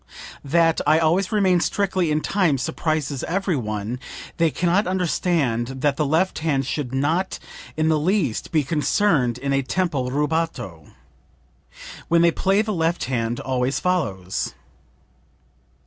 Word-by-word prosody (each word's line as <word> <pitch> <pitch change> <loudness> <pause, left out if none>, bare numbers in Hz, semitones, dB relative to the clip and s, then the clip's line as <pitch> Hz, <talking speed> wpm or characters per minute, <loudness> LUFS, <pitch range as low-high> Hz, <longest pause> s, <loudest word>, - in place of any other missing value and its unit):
That 165 +3 +2
I 155 +1 +5
always 170 +4 +2
remain 190 -4 +3
strictly 190 -2 0
in 155 0 +1
time 180 -8 +1
surprises 155 0 -2
every 190 0 -1
one; 110 -1 -3 0.4
they 165 -1 +3
can 175 +3 -2
not 185 +4 +2
understand 165 -9 0
that 145 -1 +2
the 150 -1 0
left 165 +6 +1
hand 145 -4 0
should 135 -1 -3
not 155 +8 0 0.4
in 155 0 +1
the 155 -1 +2
least 165 - 0
be 155 -3 +2
concerned 150 - +1
in 140 +2 -2
a 135 - +2
tempo 140 -2 -1
rubato. 145 - -2 1.2
When 170 0 +4
they 170 - +5
play 195 +5 +2
the 215 -1 -2
left 165 0 0
hand 120 -2 -2
always 130 0 -1
follows." 100 - -2
155 Hz, 140 wpm, -22 LUFS, 130-180 Hz, 1.2 s, I